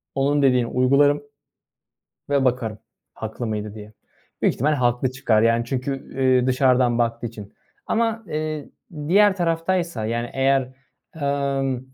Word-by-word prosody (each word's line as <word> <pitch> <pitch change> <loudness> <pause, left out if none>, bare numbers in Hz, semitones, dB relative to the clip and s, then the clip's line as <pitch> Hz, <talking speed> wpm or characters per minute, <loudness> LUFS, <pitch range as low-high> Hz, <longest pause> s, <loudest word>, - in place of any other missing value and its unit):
onun 145 +2 +2
dediğini 125 -3 +3
uygularım 140 +4 +3 1.1
ve 140 -2 +2
bakarım 120 -4 -1 0.4
haklı 110 +2 -5
mıydı 105 -1 -4
diye. 105 0 -11 0.5
Büyük - - +3
ihtimal 150 +4 +1
haklı 125 -1 +1
çıkar, 120 -5 +2
yani, 115 +1 +3
çünkü, 130 +2 -2
ııı, 130 -2 +1
dışarıdan 125 -2 +3
baktığı 115 0 -1
için 105 -3 -10 0.3
ama, 225 0 0
eee, 155 -2 -4 0.4
diğer 200 +2 +5
taraftaysa, 170 -6 -1
yani, 120 +1 -2
eğer, 135 0 +2 0.6
emm, 140 -2 -1
130 Hz, 125 wpm, -22 LUFS, 120-145 Hz, 1.1 s, diğer